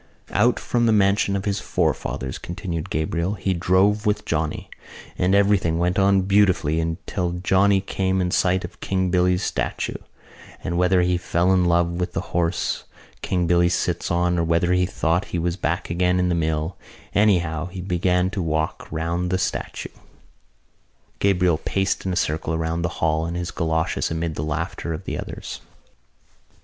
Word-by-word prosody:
"Out - - +3
from 120 -1 +1
the - - +4
mansion 100 -1 +3
of 95 - -3
his 100 -1 0
forefathers," 65 -7 -2
continued 85 -2 -5
Gabriel, 85 +5 -1
"he 95 -1 -1
drove 95 +5 +2
with 105 0 0
Johnny. 75 -1 -2 0.5
And 90 +2 +2
everything 100 -5 +3
went 90 +2 +1
on 95 -1 +4
beautifully 95 -5 +3
until 85 +2 -2
Johnny 95 +2 +3
came 95 -1 -1
in 90 -1 0
sight 90 +1 +2
of - - -12
King 95 -2 -1
Billy's 90 0 +2
statue: - - -2 0.7
and 85 - -2
whether 90 +1 +3
he 90 0 +1
fell 90 +1 +1
in 90 -1 +3
love 85 0 +2
with 90 - -2
the - - -5
horse 85 0 0 0.4
King 90 -2 0
Billy 85 0 +3
sits 90 0 -1
on 90 0 +1
or - - +2
whether 85 +2 +2
he 90 0 +2
thought 85 0 0
he - - -4
was 85 0 -1
back - - -2
again 90 +1 +2
in 90 0 +1
the - - +1
mill, 80 0 -1 0.4
anyhow 85 -6 +2
he 90 +1 -8
began 90 0 +1
to 100 - -2
walk 80 -1 -2
round 85 +3 -1
the 95 - +1
statue." - - -3 1.3
Gabriel 90 -5 +2
paced 95 +2 -1
in - - 0
a - - -1
circle 80 -2 -1
round 80 +1 -2
the 90 - 0 0.2
hall 80 +1 +1
in 85 - -4
his 90 0 -3
goloshes 80 -1 -1
amid 80 0 -2
the 75 - -4
laughter 80 +2 -3
of 80 - -6
the - - -4
others. - - -6
90 Hz, 170 wpm, -23 LUFS, 85-95 Hz, 1.3 s, the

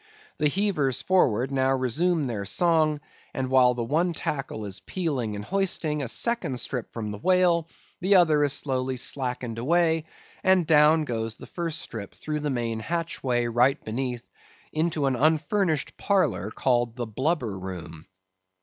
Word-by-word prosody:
The 150 - +3
heavers 155 - 0
forward 135 - +2
now 135 0 +2
resume 150 +6 +1
their 110 -5 -3
song, 155 - +2 0.3
and 130 -1 -2
while 125 -2 +5
the 120 - -2
one 165 +8 +1
tackle 135 -9 -4
is 100 -1 -4
peeling 130 - -3
and 105 0 -6
hoisting 175 -6 -1
a 135 - -2
second 165 - -1
strip 125 0 -4
from 110 -3 -5
the 105 - -7
whale, 180 - +3 0.3
the 195 +3 +3
other 160 -5 +5
is 145 - +3
slowly 130 -2 -1
slackened 125 -3 -1
away, 160 +3 +2 0.4
and 190 -2 +4
down 155 0 +5
goes 115 -3 -3
the - - -11
first 165 -2 -4
strip 105 -4 -8
through 150 -1 -4
the 150 0 -2
main 115 -4 -2
hatchway 135 -4 -1
right 120 +3 +2
beneath, 120 +1 -4 0.5
into 155 -2 0
an 135 -1 +1
unfurnished 155 - +1
parlor 200 -2 +1
called 120 -3 0
the 120 -2 -3
blubber 125 - -1
room. 85 -4 -8
135 Hz, 155 wpm, -26 LUFS, 120-165 Hz, 0.5 s, while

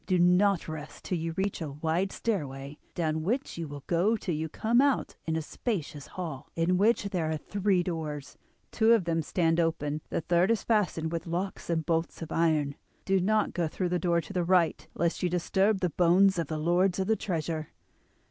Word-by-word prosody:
Do 185 - +3
not 180 +2 +4
rest 155 -2 -7
till 180 - -2
you 165 0 -3
reach 190 +1 -2
a 155 - -3
wide 165 +6 -1
stairway, 145 -9 -3 0.2
down 160 -2 0
which 225 - -2
you 165 - -3
will 145 -1 -8
go 185 +7 +2
till 185 -4 -3
you 155 +1 -2
come 235 +9 +2
out 280 -2 +1
into 160 0 0
a - - -1
spacious 150 - -4
hall, 160 -8 -6
in 175 +2 +2
which 220 +3 +3
there 170 -5 -1
are 160 - -1
three 195 +2 0
doors; 155 -5 -4 0.4
two 225 0 +4
of 225 -5 +3
them 165 -1 +1
stand 165 +1 +1
open, 155 -2 0
the - - -1
third 175 +3 +2
is 230 -3 +1
fastened 180 -8 +1
with 170 0 -4
locks 180 +3 -3
and 160 -2 0
bolts 165 +1 -1
of 160 - -8
iron. 155 -4 +2 0.3
Do 195 0 +3
not 215 +3 +1
go 170 -2 0
through 180 +3 -2
the 180 0 0
door 170 0 +2
to 180 - -10
the 180 -2 +1
right 175 -1 +2
lest 170 0 0
you 180 - +1
disturb 190 +4 +1
the 180 -2 +1
bones 180 +2 +4
of 165 - -1
the 155 - -3
lords 175 +4 +2
of 190 - 0
the 220 +3 +2
treasure. 160 -6 -3
170 Hz, 205 wpm, -29 LUFS, 160-190 Hz, 0.4 s, not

